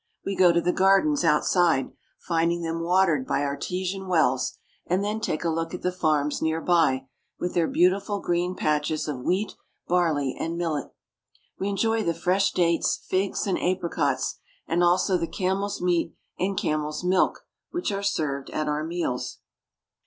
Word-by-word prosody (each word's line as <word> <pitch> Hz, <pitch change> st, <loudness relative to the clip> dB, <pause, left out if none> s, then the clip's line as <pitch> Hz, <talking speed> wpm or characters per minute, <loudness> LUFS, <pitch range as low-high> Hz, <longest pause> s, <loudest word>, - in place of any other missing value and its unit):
We 195 Hz, -, -2 dB
go 180 Hz, -2 st, +6 dB
to 170 Hz, -, +3 dB
the 180 Hz, -, +1 dB
gardens 195 Hz, +11 st, +3 dB
outside, 165 Hz, -2 st, +3 dB, 0.3 s
finding 170 Hz, 0 st, 0 dB
them 165 Hz, 0 st, -2 dB
watered 170 Hz, -5 st, +2 dB
by 145 Hz, -, 0 dB
artesian 180 Hz, +7 st, -3 dB
wells, 130 Hz, -8 st, +1 dB, 0.3 s
and 185 Hz, +3 st, +1 dB
then 210 Hz, +2 st, -2 dB
take 155 Hz, -, -2 dB
a 170 Hz, -, +1 dB
look 165 Hz, +1 st, -2 dB
at -, -, -9 dB
the 180 Hz, -, +1 dB
farms 155 Hz, -5 st, 0 dB
near 160 Hz, 0 st, 0 dB
by, 160 Hz, -7 st, +2 dB, 0.3 s
with 180 Hz, -, -3 dB
their 170 Hz, -2 st, +2 dB
beautiful 195 Hz, +3 st, +2 dB
green 175 Hz, +1 st, -1 dB
patches 150 Hz, 0 st, 0 dB
of 145 Hz, -4 st, -3 dB
wheat, 185 Hz, +11 st, -1 dB, 0.3 s
barley, 160 Hz, -7 st, +1 dB
and 165 Hz, +1 st, -3 dB
millet. 165 Hz, -4 st, -2 dB, 0.7 s
We 195 Hz, -, -1 dB
enjoy 225 Hz, +3 st, +1 dB
the 170 Hz, -5 st, 0 dB
fresh 185 Hz, +4 st, +2 dB
dates, 170 Hz, -1 st, +2 dB
figs, 190 Hz, +1 st, 0 dB
and 195 Hz, -, -1 dB
apricots, 170 Hz, -7 st, -1 dB, 0.3 s
and 175 Hz, +2 st, +1 dB
also 180 Hz, +1 st, +3 dB
the 165 Hz, -, -1 dB
camel's 195 Hz, +2 st, -2 dB
meat 175 Hz, -2 st, +1 dB, 0.2 s
and 190 Hz, +1 st, -1 dB
camel's 150 Hz, +1 st, -1 dB
milk 185 Hz, +1 st, +1 dB, 0.2 s
which 350 Hz, -9 st, -2 dB
are 200 Hz, 0 st, -2 dB
served 145 Hz, -8 st, -1 dB
at 155 Hz, 0 st, -2 dB
our 150 Hz, +1 st, -1 dB
meals. 165 Hz, -6 st, -3 dB
175 Hz, 160 wpm, -25 LUFS, 155-185 Hz, 0.7 s, go